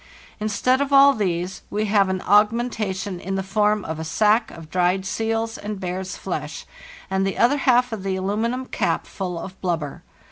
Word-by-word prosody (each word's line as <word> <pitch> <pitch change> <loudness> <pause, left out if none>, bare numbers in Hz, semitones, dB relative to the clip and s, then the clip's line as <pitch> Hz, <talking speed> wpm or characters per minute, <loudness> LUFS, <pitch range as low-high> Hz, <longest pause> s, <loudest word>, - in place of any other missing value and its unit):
Instead 215 +5 +1
of 280 0 -1
all 275 0 +7
these 185 -4 -2
we 210 +1 -1
have 200 -2 +3
an 190 -1 -1
aug 210 +2 +5
mentation 210 -5 -3
in 195 +2 -4
the 190 - -1
form 210 +1 +1
of 160 0 -4
a - - -3
sack 215 +7 +2
of 165 -2 -11
dried 180 +3 +1
seal's 225 +2 -2
and 210 -1 -5
bear's 185 0 -4
flesh 155 -5 -5 0.5
and 190 0 +1
the 195 0 -1
other 255 +5 +4
half 250 -3 +3
of 215 - -4
the 190 0 -2
aluminium 220 +7 -1
cap - - -1
full 180 -3 -5
of 185 +3 -8
blubber. 165 -6 -2
200 Hz, 185 wpm, -23 LUFS, 185-225 Hz, 0.5 s, all